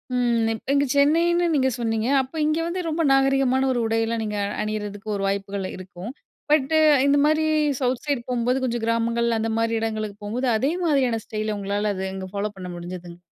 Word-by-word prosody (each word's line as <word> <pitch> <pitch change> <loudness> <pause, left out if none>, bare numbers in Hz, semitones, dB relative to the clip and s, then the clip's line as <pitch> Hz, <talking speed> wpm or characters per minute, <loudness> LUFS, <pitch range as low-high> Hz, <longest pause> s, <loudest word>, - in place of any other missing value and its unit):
ம், 230 -2 +1
இங்க 285 0 +3
சென்னைன்னு 335 +5 +3
நீங்க 265 -1 +3
சொன்னீங்க, 225 0 -1
அப்ப 265 +5 -9
இங்க 310 +1 +1
வந்து 360 +2 -2
ரொம்ப 325 +1 0
நாகரீகமான 270 -1 +3
ஒரு 240 - 0
உடையில 225 +1 0
நீங்க 210 -1 -3 0.3
அணியிறதுக்கு 215 0 -5
ஒரு 195 - -2
வாய்ப்புகள் 195 -1 -2
இருக்கும். 185 +4 -8 0.4
பட் 295 -1 +3 0.4
இந்த 285 +1 +4
மாரி 310 +1 +2 0.4
சவுத் 250 -1 0
சைட் 270 -5 -2
போம்போது 250 +1 +1
கொஞ்சம் 235 -2 -2
கிராமங்கள் 230 +1 +1
அந்த 225 +1 -1
மாரி 230 0 +1
இடங்களுக்கு 215 -2 -3
போம்போது 240 +5 -2
அதே 275 +7 +1
மாதிரியான 260 -8 +2
ஸ்டைல் 215 0 -3
உங்களால 205 +1 -1
அது 190 - -4
அங்க 190 0 -5
ஃபாலோ - - -30
ஃபாலோ 205 - -11
பண்ண 185 -1 -7
முடிஞ்சுதுங்க. 175 0 -8
230 Hz, 175 wpm, -23 LUFS, 210-270 Hz, 0.4 s, இந்த